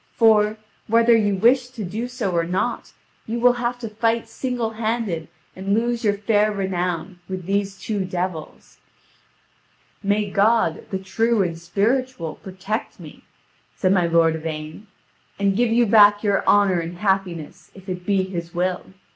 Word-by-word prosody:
For, 215 -2 +4 0.3
whether 230 +1 +5
you 205 -3 +2
wish 245 +6 +3
to 245 -4 -7
do 215 +7 -4
so 245 -6 -3
or 170 -1 +1
not, 180 +3 -2 0.4
you 230 +2 -2
will 245 +1 +5
have 245 0 -2
to 230 - -4
fight 225 +2 0
singlehanded 225 - -3 0.3
and 195 +2 -1
lose 235 +1 -1
your 205 -2 +2
fair 210 0 +2
renown 180 -2 -3
with 185 -2 -5
these 195 0 -1
two 205 -1 -3
devils." 180 -3 -5 1.2
"May 205 +1 0
God, 220 +4 +2
the 195 - -2
true 225 +3 +1
and 170 -2 -2
spiritual, 200 - -1
protect 190 +3 -5
me," - - -12 0.5
said 185 -1 +2
my 180 -3 +2
lord 165 -1 +3
Yvain, 155 +5 -7 0.5
"and 200 -1 +1
give 240 +2 +2
you 235 +1 +4
back 205 -1 +6
your 200 -2 +1
honour 200 -3 +4
and 170 +1 -5
happiness, 185 -5 -2
if 190 0 -14
it 180 -1 -5
be 195 0 +1
His 170 -3 -6
will. 180 +1 -1
200 Hz, 155 wpm, -22 LUFS, 180-225 Hz, 1.2 s, back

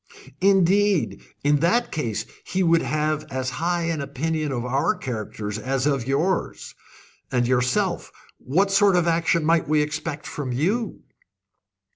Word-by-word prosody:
"Indeed! 195 -1 +3 0.2
In 145 +1 +4
that 170 - +1
case 115 -9 -2 0.2
he 190 0 -1
would 165 -1 +4
have 155 0 -1
as 130 -1 -3
high 175 0 0
an 165 -3 -1
opinion 150 +2 -2
of 120 -2 -3
our 135 +3 +1
characters 110 -3 -5
as 130 +3 -1
of 135 -5 0
yours. 165 +7 -1 0.6
And 120 -2 +1
yourself 125 0 0 0.3
what 190 +10 +1
sort 200 -1 +4
of 175 -1 +3
action 165 -1 +2
might 165 +1 +2
we 150 -1 +3
expect 150 0 -4
from 140 -4 -5
you?" 195 - -1
155 Hz, 140 wpm, -23 LUFS, 130-170 Hz, 0.6 s, In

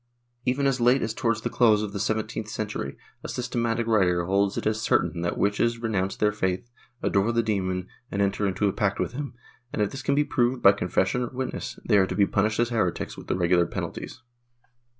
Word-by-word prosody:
Even 130 +2 +1
as 135 -2 +1
late 125 +3 +4
as 110 - -2
towards 115 -2 0
the - - -2
close 110 -3 +4
of 100 -2 -5
the 100 - -3
seventeenth 110 0 -2
century, 105 -11 -4 0.3
a - - -5
systematic 120 -2 -1
writer 90 -6 +2
holds 100 +2 +1
it - - -3
as 110 0 0
certain 90 -6 +1
that 85 - -1
witches 105 +3 +1
renounce 100 -5 -1
the 105 0 +2
faith, 95 0 -2 0.4
adore 100 +3 +2
the 115 0 +1
demon 95 -4 -1 0.2
and 100 - -3
enter 100 +1 +1
into 100 +2 0
a 95 - 0
pact 100 -1 0
with - - -1
him 140 -1 -5 0.4
and, - - -4
if 105 -1 +1
this 135 - -6
can 140 - +1
be 150 - +4
proved 125 -2 +1
by 100 - +9
confession 95 +4 0
or 120 - -1
witnesses, 130 0 -5
they 105 -3 +5
are 95 - +3
to - - -4
be 100 - +4
punished 110 +3 0
as 120 0 +2
heretics 110 -7 -1
with - - -11
the - - 0
regular 85 -1 +3
penalties. 120 - -6
105 Hz, 215 wpm, -26 LUFS, 100-120 Hz, 0.4 s, by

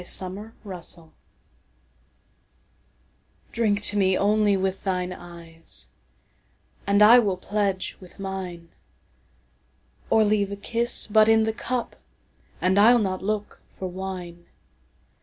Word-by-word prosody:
To 180 - -8
Celia 195 +4 -3 3.0
DRINK 210 -3 0
to 210 - +3
me 190 -1 +3
only 205 0 +2
with 190 0 -2
thine 180 -2 -2
eyes, 170 -2 -8 1.0
And 200 +1 +5
I 235 +4 +9
will 200 -5 0
pledge 200 -2 -2
with 185 -2 -15
mine; 185 -4 -6 1.4
Or 220 - +4
leave 205 -1 +1
a - - -3
kiss 235 +4 +1
but 215 0 +4
in 225 0 +5
the 220 0 -1
cupAnd 220 -5 -4
I'll 235 +4 +7
not 190 -4 -1
look 210 +1 -4
for 190 - -7
wine. 180 -2 -7
200 Hz, 110 wpm, -24 LUFS, 185-215 Hz, 3.0 s, I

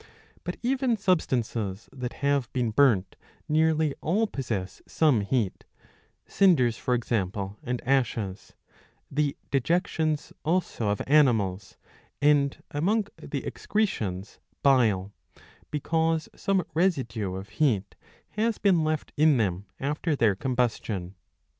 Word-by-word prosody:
But - - -4
even 255 -2 +1
substances 120 - -1
that 125 -2 -5
have 140 -4 +1
been 120 -3 0
burnt 110 -6 +3 0.3
nearly 155 -1 +2
all 205 +8 +2
possess 110 - -4
some 150 -9 +3
heat, 105 -1 -1 0.6
cinders, 145 - +3
for 125 +1 0
example, 100 -4 -2
and 125 -1 -3
ashes, 115 -7 -1 0.6
the 145 0 0
dejections 155 +1 0
also 160 - 0
of 100 - -1
animals, 110 -10 +2 0.4
and, 145 -1 +2
among 200 +8 +1
the - - -5
excretions, 105 - -2 0.2
bile; 110 -9 +3 0.6
because 160 +1 0
some 195 -3 +1
residue 125 - 0
of 95 +2 -7
heat 110 -5 0 0.4
has 220 +1 0
been 185 -6 +3
left 155 -1 -2
in 150 -2 +5
them 100 -3 -1
after 150 +3 -1
their 115 -6 +3
combustion. 110 -5 -2
135 Hz, 110 wpm, -27 LUFS, 105-160 Hz, 0.6 s, in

